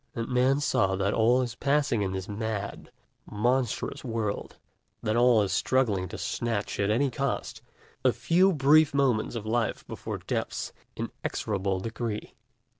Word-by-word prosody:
And 115 -1 -3
Man 130 +3 +3
saw 95 -9 +2
that 100 +1 0
all 120 +3 +4
is 120 -2 -4
passing 140 -5 +1
in 95 -2 -1
this 95 0 -4
mad, 105 -1 -4 0.4
monstrous 120 +5 0
world, 110 -4 -3 0.5
that 110 - 0
all 120 -2 +5
is 100 - -2
struggling 110 -8 +1
to - - -7
snatch, 115 -4 -2
at 100 0 +1
any 130 +5 +2
cost, 140 +1 -3 0.4
a - - +5
few 185 +3 +3
brief 150 -1 +4
moments 125 -5 +1
of 110 -2 -4
life 115 0 -1
before - - -5
Death's - - -3 0.2
inexorable 95 -3 -2
decree. 115 0 -4
115 Hz, 145 wpm, -28 LUFS, 105-130 Hz, 0.5 s, all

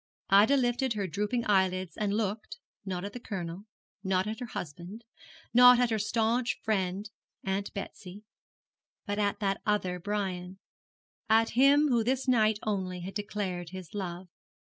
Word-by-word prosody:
Ida 210 +8 +6
lifted 245 0 +1
her 205 -2 -2
drooping 210 +7 -2
eyelids 185 -3 +1
and 210 -2 -1
looked, 215 0 -3 0.3
not 185 -1 -4
at 200 - -6
the 245 - -6
Colonel, 185 -4 -6 0.4
not 190 -1 +1
at 220 +2 -4
her 245 - -5
husband, 180 +3 -7 0.5
not 250 0 +8
at 245 -2 +2
her 220 - +1
staunch 225 +3 0
friend 195 -1 -1 0.4
Aunt 195 +1 -2
Betsy, 200 0 -8 0.8
but 205 -1 -2
at 200 -1 0
that 195 -1 0
other 185 -4 0
Brian 190 -2 -3 0.7
at 225 +1 +4
him 280 +4 +5
who 235 -3 +3
this 260 +3 -1
night 220 -4 +3
only 185 -4 -2
had 190 +3 -6
declared 195 -4 -4
his 185 -3 -9
love. 185 -2 -5
205 Hz, 150 wpm, -29 LUFS, 185-225 Hz, 0.8 s, not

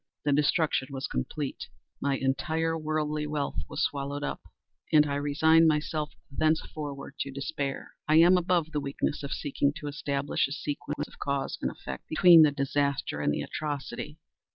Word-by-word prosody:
The 145 - +3
destruction 150 -1 +2
was 135 -1 -4
complete. 130 - -4 0.3
My 140 -1 +1
entire 155 +5 0
worldly 155 -1 -1
wealth 150 -1 -2
was - - -1
swallowed 140 0 -2
up, - - -3 0.5
and 150 -1 +6
I 145 - -2
resigned 160 +3 +4
myself 150 0 0 0.2
thenceforward 150 -3 -2
to 140 - -2
despair. 140 0 -4 0.2
I 155 - +4
am 170 +3 +7
above 175 -3 +1
the 150 -2 -1
weakness 140 +2 -2
of 140 0 -6
seeking 140 0 0
to 150 - -8
establish 145 -1 -1
a 140 - -5
sequence 145 -1 -4
of - - -18
cause 140 -1 -2
and - - 0
effect, - - -8
between 170 +1 +7
the 155 - +7
disaster 140 - -1
and 75 - +2
the - - -1
atrocity. 150 0 -5
145 Hz, 160 wpm, -28 LUFS, 140-155 Hz, 0.5 s, am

